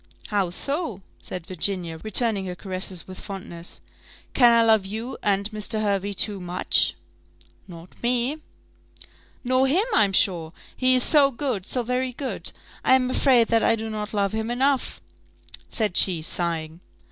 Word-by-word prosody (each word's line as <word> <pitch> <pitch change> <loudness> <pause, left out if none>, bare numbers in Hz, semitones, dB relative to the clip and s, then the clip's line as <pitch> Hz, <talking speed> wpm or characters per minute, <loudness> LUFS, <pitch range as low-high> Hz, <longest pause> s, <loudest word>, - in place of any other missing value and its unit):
"How 200 -4 0
so?" 275 - -1 0.2
said 180 -3 -7
Virginia, 180 -2 -2
returning 215 -2 0
her 180 - -5
caresses 185 -1 -5
with 185 -1 -10
fondness: 180 -4 -8 0.5
"can 245 -2 +6
I 230 0 +5
love 220 -3 +4
you 220 +6 -6
and 200 -1 +1
Mr. 215 +1 -2
Hervey 200 -1 -1
too 200 0 +1
much?" 180 0 +1 0.7
"Not 170 -1 -11
me." 250 +5 0 1.0
"Nor 255 +1 +2
him, 355 +11 +3
I'm 205 -3 +4
sure 170 -4 +2 0.2
he 255 0 +3
is 250 - +4
so 290 -3 +5
good, 240 -7 -3
so 250 - 0
very 250 +1 -2
good! 265 +1 -4 0.3
I 260 - +5
am 255 -1 +1
afraid 250 -4 +3
that 230 -1 +3
I 230 - +4
do 220 0 -5
not 210 -1 -5
love 200 -2 0
him 220 +1 -3
enough," 265 +2 0 0.7
said 215 -6 0
she, 175 -5 +2
sighing. 165 -1 -2
215 Hz, 155 wpm, -24 LUFS, 185-250 Hz, 1.0 s, can